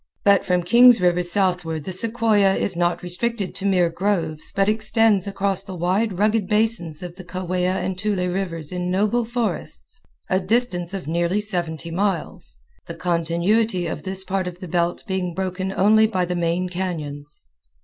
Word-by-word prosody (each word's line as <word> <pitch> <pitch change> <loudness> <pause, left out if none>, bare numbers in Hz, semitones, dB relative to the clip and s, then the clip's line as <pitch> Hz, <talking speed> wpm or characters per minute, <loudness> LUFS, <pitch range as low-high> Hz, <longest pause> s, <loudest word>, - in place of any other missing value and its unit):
But 200 -1 +5
from 180 -1 +1
Kings 240 +5 +7
River 180 -1 +2
south 180 0 0
ward 160 -2 -4
the 190 - -5
sequoia 215 -1 +2
is 190 - -1
not 175 +1 0
restricted 195 +3 -2
to 200 - -3
mere 180 -3 +3
groves 165 -4 -1
but 195 0 +1
extends 215 -2 +2
across 195 -1 -1
the 195 -2 -7
wide 185 +4 0
rugged 210 0 +2
basins 210 -7 0
of 175 0 -8
the 185 - -9
Kaweah 180 0 -2
and 185 0 -3
Tule 200 -3 0
Rivers 175 -5 -3
in 180 0 -3
noble 210 +6 +1
forests, 235 0 -4 0.3
a 185 - +2
distance 190 -3 +1
of 185 -6 -6
nearly 170 +4 0
seventy 170 -5 -2
miles, 190 -1 -2 0.3
the - - -6
continuity 175 +4 0
of 160 - -4
this 190 +3 -3
part 190 -1 -2
of 175 -1 -6
the 185 - -7
belt 175 +1 -1
being 185 -4 -2
broken 190 0 -2
only 220 +3 +4
by 185 -4 0
the 180 0 -3
main 175 +1 0
cañons. 155 -6 -5
185 Hz, 170 wpm, -22 LUFS, 175-205 Hz, 0.3 s, Kings